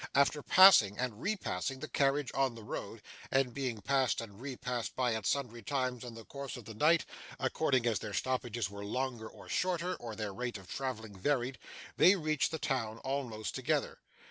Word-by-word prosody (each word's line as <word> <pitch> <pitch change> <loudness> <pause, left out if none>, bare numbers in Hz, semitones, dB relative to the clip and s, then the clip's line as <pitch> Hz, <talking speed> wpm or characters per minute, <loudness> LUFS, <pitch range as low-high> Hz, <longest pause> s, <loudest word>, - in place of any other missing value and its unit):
After 140 +2 +4
passing 160 - +7
and 125 -3 -3
repassing 135 - -2
the - - -5
carriage 140 -2 +1
on 135 -3 +1
the 115 - -10
road, - - -6 0.3
and 130 -2 +2
being 125 -5 -3
passed 130 -5 +2
and 110 -1 -8
repassed 125 -3 -4
by 125 -2 +1
it 110 -2 -2
sundry 120 -4 -1
times 125 +1 -2
in 120 -2 -8
the 115 -1 -10
course 140 -2 -6
of 120 - -10
the 110 - -8
night, 155 +9 +4 0.3
according 130 -2 +1
as 115 -3 +2
their 105 - -6
stoppages 120 -2 -1
were 100 +1 -8
longer 120 +1 -3
or - - -14
shorter; 180 0 0
or 115 -2 -7
their 105 -2 -4
rate 120 +2 -3
of 95 -2 -13
travelling 110 -3 -4
varied, 125 +4 0 0.4
they 185 - +7
reached 155 -5 +1
the 160 - -3
town 115 -7 -1
almost 130 -6 -3
together. 145 +2 -1
125 Hz, 185 wpm, -33 LUFS, 110-140 Hz, 0.4 s, passing